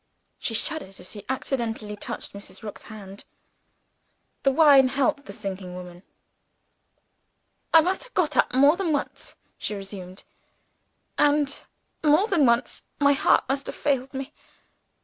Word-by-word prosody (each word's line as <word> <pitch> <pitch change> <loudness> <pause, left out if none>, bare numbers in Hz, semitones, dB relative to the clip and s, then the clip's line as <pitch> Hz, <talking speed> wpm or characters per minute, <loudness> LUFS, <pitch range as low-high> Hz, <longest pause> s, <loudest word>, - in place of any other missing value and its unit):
She 225 - -2
shuddered 220 - -1
as 180 - -9
she 205 -2 -9
accidentally 230 -5 -3
touched 205 - -5
Mrs. 200 +2 -11
Rook's 210 - -7
hand. 200 -2 -10 1.2
The 275 - +3
wine 275 -2 +7
helped 275 +1 0
the - - -8
sinking 190 -2 -6
woman. 180 -1 -9 1.7
"I 325 - +8
must 370 +8 -1
have - - -18
got 305 -5 +1
up - - +3
more 280 +5 +5
than 365 -3 -1
once," 285 - -4 0.2
she 210 - -3
resumed. 195 -2 -8 1.0
"And 290 -1 +2 0.4
more 305 +6 +5
than 335 - +3
once 235 0 +1 0.2
my 285 0 +5
heart 275 - +3
must 275 +1 -1
have - - -5
failed 270 -2 0
me. 270 +2 -6
265 Hz, 140 wpm, -25 LUFS, 205-290 Hz, 1.7 s, I